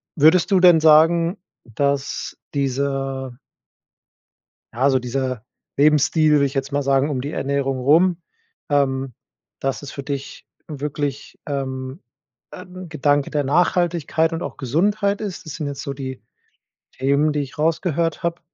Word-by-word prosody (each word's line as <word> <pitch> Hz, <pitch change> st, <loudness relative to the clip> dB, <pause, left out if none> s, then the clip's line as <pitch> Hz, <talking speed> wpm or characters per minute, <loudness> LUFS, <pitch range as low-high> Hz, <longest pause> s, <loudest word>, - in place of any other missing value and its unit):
Würdest 160 Hz, +5 st, +4 dB
du 190 Hz, -, +5 dB
denn 175 Hz, -3 st, +7 dB
sagen, 165 Hz, +3 st, +5 dB, 0.3 s
dass 140 Hz, +4 st, -2 dB, 0.2 s
dieser 135 Hz, -2 st, -2 dB, 1.4 s
ja, 115 Hz, -, -9 dB
also 135 Hz, -1 st, +4 dB
dieser 130 Hz, -1 st, -3 dB, 0.3 s
Lebensstil, 150 Hz, +1 st, +4 dB
würde 140 Hz, -1 st, +4 dB
ich 135 Hz, -, -3 dB
jetzt 135 Hz, 0 st, -2 dB
mal 145 Hz, -, 0 dB
sagen, 135 Hz, +2 st, +2 dB
um 130 Hz, -3 st, -2 dB
die 145 Hz, -, -5 dB
Ernährung 135 Hz, -2 st, -1 dB
rum 165 Hz, +6 st, +3 dB, 0.5 s
ähm, 135 Hz, -2 st, 0 dB, 0.5 s
dass 135 Hz, -1 st, -2 dB
es 145 Hz, -, -8 dB
für 140 Hz, -, -7 dB
dich 140 Hz, -1 st, -6 dB, 0.2 s
wirklich, 145 Hz, -2 st, -4 dB
ähm, 130 Hz, +1 st, -4 dB, 0.5 s
ein 185 Hz, -1 st, -10 dB
Gedanke 145 Hz, -2 st, +1 dB
der 150 Hz, -2 st, 0 dB
Nachhaltigkeit 165 Hz, +1 st, +1 dB
und 165 Hz, -, -3 dB
auch -, -, -6 dB
Gesundheit 200 Hz, -, 0 dB
ist? 195 Hz, -5 st, -6 dB
Das 155 Hz, -, -7 dB
sind 155 Hz, -3 st, -4 dB
jetzt 140 Hz, -1 st, -5 dB
so 140 Hz, -, -4 dB
die 130 Hz, -1 st, -7 dB, 0.7 s
Themen, 140 Hz, +3 st, +1 dB
die 150 Hz, -, -1 dB
ich 140 Hz, +1 st, -7 dB
rausgehört 165 Hz, +1 st, 0 dB
habe. 170 Hz, 0 st, -2 dB
145 Hz, 140 wpm, -21 LUFS, 135-165 Hz, 1.4 s, denn